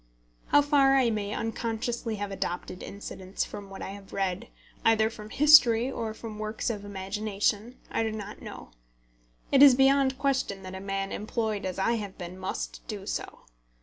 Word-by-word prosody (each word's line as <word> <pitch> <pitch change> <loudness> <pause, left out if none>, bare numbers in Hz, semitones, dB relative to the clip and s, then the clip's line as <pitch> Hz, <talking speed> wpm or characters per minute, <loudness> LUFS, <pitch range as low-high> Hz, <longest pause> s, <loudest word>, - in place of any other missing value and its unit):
How 290 - +5
far 275 -2 +4
I 255 -4 +4
may 205 -2 -2
unconsciously 225 +1 -2
have 205 -1 -4
adopted 180 -1 -4
incidents 190 -1 -5
from 200 -1 -9
what 195 - -8
I - - -5
have 200 -1 -11
read, 190 -2 -2 0.4
either 220 0 +4
from 215 -2 -10
history 265 -3 +6
or 225 -4 -4
from 220 -2 -8
works 215 +2 -2
of 205 -3 -6
imagination, 205 +3 -2
I - - 0
do 220 -1 0
not 210 -1 -7
know. - - -9 0.8
It 275 - +5
is 280 -3 +10
beyond 270 0 +4
question 265 -8 -1
that 185 0 -8
a 190 - -6
man 195 0 -3
employed 215 -1 -2
as 185 - -5
I 230 +5 +1
have 205 -3 -6
been 180 0 -8
must - - -4
do - - -6
so. - - -5
215 Hz, 175 wpm, -28 LUFS, 195-235 Hz, 0.8 s, is